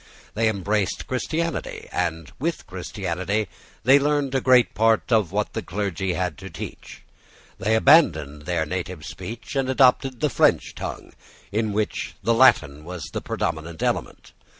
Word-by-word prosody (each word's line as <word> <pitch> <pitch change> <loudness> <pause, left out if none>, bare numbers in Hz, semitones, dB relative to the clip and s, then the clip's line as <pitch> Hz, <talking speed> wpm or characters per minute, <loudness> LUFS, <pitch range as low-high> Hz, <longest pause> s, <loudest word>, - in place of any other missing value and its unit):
They 110 +1 +2
embraced 100 0 -1
Christianity; 165 +6 -3
and 80 -3 -2
with - - -2
Christianity 95 +5 -3 0.4
they 135 +4 +6
learned 145 -1 0
a 135 - +1
great 125 -1 +4
part 115 +2 +2
of 110 -7 +3
what - - -1
the - - -2
clergy 95 -1 -2
had 90 -5 -2
to - - -8
teach. - - -9 0.6
They 110 +3 +2
abandoned 80 - +4
their 85 -3 0
native 90 -1 -5
speech, 115 +5 -8
and 135 -1 0
adopted 130 -1 +3
the 150 - +1
French - - +2
tongue, - - -7 0.4
in 110 +1 0
which 105 +1 -2
the 115 - +3
Latin 75 - +4
was 85 -4 -7
the - - -3
predominant 80 +1 -3
element. - - -2
105 Hz, 150 wpm, -24 LUFS, 85-130 Hz, 0.6 s, they